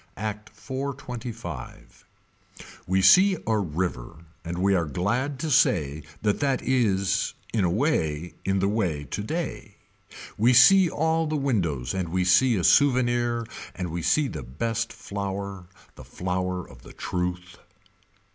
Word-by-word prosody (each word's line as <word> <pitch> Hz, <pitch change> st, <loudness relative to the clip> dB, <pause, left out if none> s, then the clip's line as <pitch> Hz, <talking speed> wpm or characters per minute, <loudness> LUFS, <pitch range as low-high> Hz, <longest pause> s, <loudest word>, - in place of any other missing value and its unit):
Act 105 Hz, 0 st, -5 dB
425. 130 Hz, -4 st, -7 dB, 0.8 s
We 95 Hz, +1 st, +2 dB
see 190 Hz, -, +6 dB
a 110 Hz, -1 st, +1 dB
river 85 Hz, -4 st, -4 dB, 0.2 s
and 85 Hz, +1 st, -5 dB
we 100 Hz, +2 st, +2 dB
are 85 Hz, -4 st, +1 dB
glad 120 Hz, -, -1 dB
to 160 Hz, -, -2 dB
say 75 Hz, -, +2 dB, 0.2 s
that 105 Hz, -1 st, +1 dB
that 135 Hz, -3 st, 0 dB
is 105 Hz, -7 st, +1 dB, 0.2 s
in 110 Hz, -4 st, +1 dB
a 90 Hz, -, +2 dB
way 85 Hz, -, 0 dB
in 95 Hz, 0 st, 0 dB
the 95 Hz, +1 st, +1 dB
way 95 Hz, -9 st, -1 dB
today. 110 Hz, -, -5 dB, 0.6 s
We 120 Hz, +4 st, +5 dB
see 175 Hz, +9 st, +7 dB
all 160 Hz, +1 st, 0 dB
the 155 Hz, -, -2 dB
windows 85 Hz, -, -1 dB
and 95 Hz, -3 st, -2 dB
we 90 Hz, +1 st, 0 dB
see 115 Hz, +7 st, +4 dB
a 90 Hz, -, -1 dB
souvenir 120 Hz, -3 st, +3 dB, 0.3 s
and 90 Hz, -2 st, -4 dB
we 85 Hz, +1 st, -3 dB
see 150 Hz, -, +2 dB
the 75 Hz, -, -6 dB
best 115 Hz, -, -3 dB
flower. 100 Hz, -3 st, -5 dB, 0.3 s
The -, -, -12 dB
flower 90 Hz, 0 st, -3 dB
of -, -, -15 dB
the -, -, -14 dB
truth. 90 Hz, 0 st, -4 dB
100 Hz, 140 wpm, -25 LUFS, 90-125 Hz, 0.8 s, see